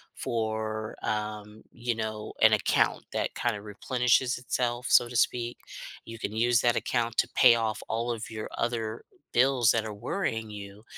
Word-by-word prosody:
for, 110 -1 -3
um, 105 0 -4
you 120 0 -2
know, 110 -1 -4
an - - +7
account - - +2
that - - -1
kinda 115 -4 -1
replenishes 125 +4 +1
itself, 125 -1 -2
so 120 - +6
to 120 - -8
speak. 120 +1 +1 0.5
You 115 0 -8
can 105 - -4
use 120 +1 +3
that 120 -1 +3
account 120 -1 -1
to - - +2
pay 120 -2 +7
off 110 -2 -1
all 115 +2 -1
of 115 -1 -5
your 110 -1 -6
other 115 -2 -2 0.3
bills 125 -2 +4
that 110 -1 0
are 110 - -5
worrying 115 - -3
you, 100 0 -9
115 Hz, 165 wpm, -28 LUFS, 110-120 Hz, 0.5 s, an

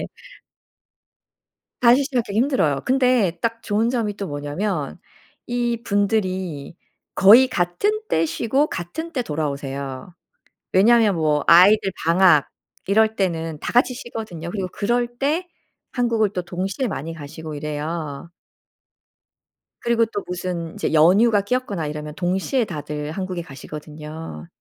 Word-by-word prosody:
네. - - -4 1.7
다시 250 +3 +5
시작하기 245 -7 -2
힘들어요. 230 - +2
근데 250 -9 +2
딱 230 0 -2
좋은 220 +3 +1
점이 225 -5 -1
또 200 - -4
뭐냐하면 145 +3 -3 0.5
이분들이 200 -9 -1 0.4
거의 230 +7 +7
같은 255 - 0
때 160 - +2
쉬고 235 - 0
같은 255 - -5
때 255 - -1
돌아오세요. 140 - -4 0.6
왜냐하면 215 +1 +5
뭐 150 -3 +1
아이들 195 +4 +6
방학 170 -3 +5 0.4
이럴 220 +2 +3
때는 165 -5 -2
다 - - -4
같이 245 +1 +3
쉬거든요. 220 - -7
그리고 190 0 -3
그럴 240 +3 0
때 310 +7 0 0.4
한국을 230 -4 +1
또 180 - -2
동시에 185 +8 -3
많이 165 -5 -5
가시고 155 0 -8
이래요. 150 +1 -5 1.5
그리고 235 -1 +2
또 205 -2 -5
무슨 180 -2 -4
이제 - - -2
연휴가 200 +8 +5
끼었거나 200 -6 -2
이러면 150 0 -6
동시에 190 - 0
다들 150 -4 -5
한국에 185 -1 -4
가시거든요. 150 - -9
185 Hz, 280 characters per minute, -22 LUFS, 160-230 Hz, 1.7 s, 거의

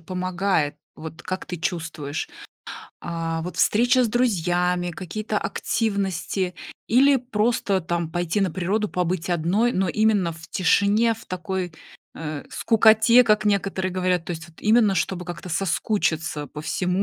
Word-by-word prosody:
помогает? 185 -3 -1 0.2
Вот 160 +1 -9
как 185 0 -4
ты 180 - -5
чувствуешь? 160 -4 -4 0.7
А, 165 -1 -3
вот 180 +2 -6
встреча 245 +4 +3
с 240 - +1
друзьями, 180 -6 +1
какие-то 210 +5 -3
активности, 195 -5 -2 0.3
или 270 +4 +5
просто 225 -5 0
там 170 -1 -2
пойти 175 +3 -1
на 190 -2 +1
природу, 195 +5 -1
побыть 180 -1 -2
одной, 175 +8 +2
но 190 -3 0
именно 205 -3 +2
в 160 0 -13
тишине, 200 +5 +3
в 225 - -14
такой, 185 -1 -4 0.4
э, 155 -2 -5
скукоте, 225 +2 +5
как 215 -3 +2
некоторые 195 -2 0
говорят, 180 -2 0
то - - -7
есть 165 0 -6
вот 165 - -18
именно 215 -2 +4
чтобы 180 +1 -1
как-то 175 +1 -7
соскучиться 160 -4 -1
по 150 - -8
всему, 180 +4 -1
185 Hz, 140 wpm, -23 LUFS, 170-210 Hz, 0.7 s, или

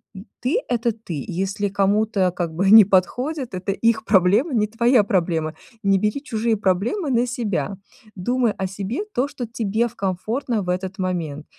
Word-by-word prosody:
м, 190 +2 -9 0.2
ты 260 - +1
это 235 -1 +1
ты, 180 - -6
если 195 +3 -2
кому-то 200 -1 +1
как 175 -2 -3
бы 195 +3 +2
не 220 0 +11
подходит, 250 - 0
это 185 +2 -2
их 230 +3 +1
проблема, 205 - +3
не 210 - +3
твоя 235 +1 +3
проблема. 170 -5 0 0.3
Не 195 -1 +3
бери 215 +8 -1
чужие 225 -3 0
проблемы 220 - 0
на 240 +1 +2
себя, 205 - -2 0.4
думай 240 +4 0
о 190 - -4
себе, 200 - -4
то, 255 +3 +1
что 255 -3 -6
тебе 225 0 -1
в - - -13
комфортно 215 +5 -2
в 180 - -6
этот 185 +1 -3
момент, 165 -5 -3
205 Hz, 170 wpm, -22 LUFS, 185-235 Hz, 0.4 s, не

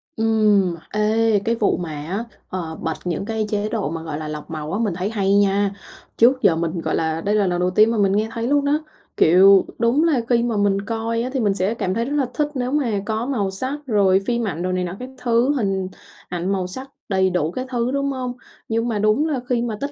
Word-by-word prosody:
Ừm, 215 -5 +2 0.2
ê, 215 0 +2
cái 230 - +1
vụ 215 -3 +1
mà 175 -3 -4
á, 160 +9 -4 0.3
ờ, 165 -4 -4
bật 160 - -1
những 175 +2 -2
cái 220 0 -2
chế 210 0 -1
độ 140 - -2
mà, 165 +1 -4
gọi 155 -2 -4
là, 155 0 -5
lọc 150 0 -7
màu 155 +1 -5
á 205 - -1
mình 215 -5 0
thấy 185 +3 -2
hay 200 -3 +1
nha. 200 0 +3 0.5
Trước 255 +3 +4
giờ 165 - +4
mình, 165 +1 -2
gọi - - -1
là, 160 0 -1
đây 205 +4 0
là 200 -3 +2
lần 175 -1 0
đầu 180 0 +2
tiên 215 +4 +4
mà 230 - -1
mình 195 -2 +3
nghe 215 +2 +1
thấy 230 +1 -3
luôn 285 0 +2
đó. 290 +2 +2 0.4
Kiểu, 190 +4 +6
đúng 240 +6 +3
là 305 -7 +2
khi 235 -1 +3
mà 235 -3 -1
mình 200 -1 +2
coi 230 +2 -2
á 255 - -3
thì 265 - 0
mình 205 -4 +2
sẽ 195 +3 0
cảm 185 -5 -2
thấy 230 +3 -1
rất 285 +3 -2
là 275 - +2
thích 300 -1 0
nếu 255 -2 -2
mà 280 -5 +1
có 220 +2 -2
màu 215 -8 -1
sắc, 260 +9 -3
rồi 195 -5 +3
phim 235 -1 0
ảnh, 170 -2 -3
rồi 185 0 -1
này 185 - 0
nọ 180 0 -4
các 255 - -7
thứ, 240 +3 +2
hình 195 -5 -1 0.4
ảnh 180 +2 -2
màu 190 -2 -1
sắc 260 +9 -7 0.2
đầy 190 -1 +2
đủ 170 -3 0
các 255 +7 -4
thứ, 245 -1 -1
đúng 280 0 0
hông? 255 -2 -3 0.4
Nhưng 230 +1 0
mà 215 -3 -1
đúng 215 +9 +2
là 290 -5 -1
khi 240 -2 +1
mà 230 -3 -3
tất 280 +1 -2
210 Hz, 255 wpm, -21 LUFS, 185-235 Hz, 0.5 s, Kiểu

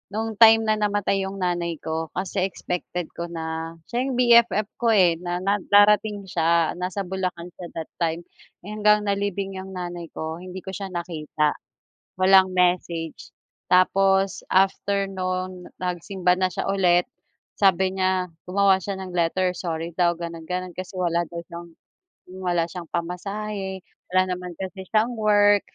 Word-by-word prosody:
No'ng 220 -1 -3
time 225 -1 +8
na 215 -1 +1
namatay 205 -1 +1
'yong 195 - -6
nanay 175 -1 -1
ko, 160 0 -2
kasi 190 +1 -2
expected 180 -2 -5
ko 170 - -5
na, 165 -1 -5 0.2
siya 240 - 0
'yong 265 - -2
BFF 235 -4 +5
ko, 230 -2 +3
eh, 175 -4 +4
na 175 0 -3
na 200 +2 +1
darating 205 0 +4
siya. 170 -3 +2
Nasa 185 +2 -2
Bulacan 180 -2 -4
siya 175 - -6
that 160 -1 -6
time. 165 0 -1 0.4
Eh, 205 - -8
hanggang 210 0 +3
nalibing 200 -1 -2
'yong 190 0 -8
nanay 175 -1 -5
ko 160 +1 -4
hindi 185 +1 -8
ko 190 - -6
siya 195 0 -5
nakita. 160 -4 -1 0.7
Walang 190 0 +6
message. 175 -3 0 0.4
Tapos 195 +1 +3
after 195 +1 +2
no'n, 185 -1 -4 0.2
nagsimba 180 +1 0
na 185 - +3
siya - - -3
ulit. 180 -3 +3 0.6
Sabi 190 -1 +4
niya 185 -1 +1 0.2
gumawa 195 0 +4
siya 200 +1 -3
ng 190 -1 -7
letter, 180 +2 +1
sorry 165 -1 -3
daw 175 -1 +3
gano'n-gano'n. 170 +2 -5
Kasi 185 +1 -7
wala 170 -1 +1
daw 170 0 -6
siyang 170 0 -8 0.7
wala 175 -2 +1
siyang 170 -1 -8
pamasahe, 190 +3 -4 0.3
wala 185 +1 +4
naman 180 -1 -6
kasi 190 0 -6
siyang 225 +3 +2
work, 205 -1 +4
185 Hz, 150 wpm, -24 LUFS, 175-200 Hz, 0.7 s, time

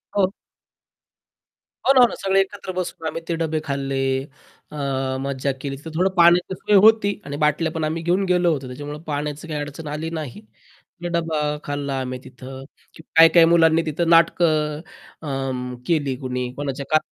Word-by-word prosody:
हो. 190 -1 +2 1.5
हो 270 - +6
ना, 255 - +6
हो 245 - +8
ना. - - -7
सगळे 195 0 +2
एकत्र 195 -1 -5
बसून 170 -3 -4
आम्ही 165 - -4
ते 170 - -1
डब्बे 160 -1 0
खाल्ले, 135 -1 -2 0.7
अ, - - -9 0.5
मज्जा 140 0 -1
केली. 135 -1 -4
तिथं 160 +3 -10
थोडं 190 +2 +3
पाण्याची 175 +2 +5
सोय 205 +3 +1
होती 215 -2 +4
आणि 145 0 -5
बाटल्या 155 +2 +1
पण 160 -1 -3
आम्ही 160 +2 -2
घेऊन 180 +3 +1
गेलो 175 -1 +3
होतो, 135 -3 -5
त्याच्यामुळं 145 +4 -7
पाण्याची 150 +1 -4
काही 150 -2 -3
अडचण 145 +2 -7
आली 160 +2 -4
नाही. 155 - -7 0.6
मग 175 - -3
डब्बा 165 -2 -1 0.2
खाल्ला 140 -1 -3
आम्ही 130 0 -5
तिथं. 130 +1 -10 0.5
काही-काही 165 +1 +8
मुलांनी 165 -1 +4
तिथं 165 +2 -1
नाटकं 155 -2 +3 0.4
अं, 130 -3 -4
केली 145 -5 +1
कुणी. 125 -1 -3
कोणाच्या 140 0 -4
का 155 - +6
155 Hz, 165 wpm, -22 LUFS, 140-170 Hz, 1.5 s, हो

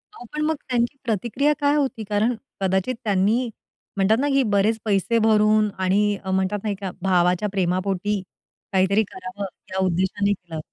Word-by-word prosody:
अहो, 245 - -11
पण 300 - -2
मग 315 +1 +1
त्यांची 245 +2 0
प्रतिक्रिया 235 +6 +1
काय 290 0 +3
होती? 265 -6 -1
कारण 210 +4 +2 0.3
कदाचित 190 +6 0
त्यांनी 210 +4 +1 0.5
म्हणतात 200 +3 +3
ना 285 - +1
की 275 0 +4
बरेच 205 +3 +3
पैसे 210 +3 +1
भरून 215 -1 +4
आणि 200 +2 +2
अ, 190 - -3
म्हणतात 190 +2 0
नाही 210 -2 -1
का 190 -2 -3
भावाच्या 180 +1 +2
प्रेमापोटी 190 +2 0 0.5
काहीतरी 195 +3 +3
करावं 190 0 -7 0.3
या - - -3
उद्देशाने 190 +3 +1
केलं. 170 -4 -8
205 Hz, 155 wpm, -23 LUFS, 190-225 Hz, 0.5 s, की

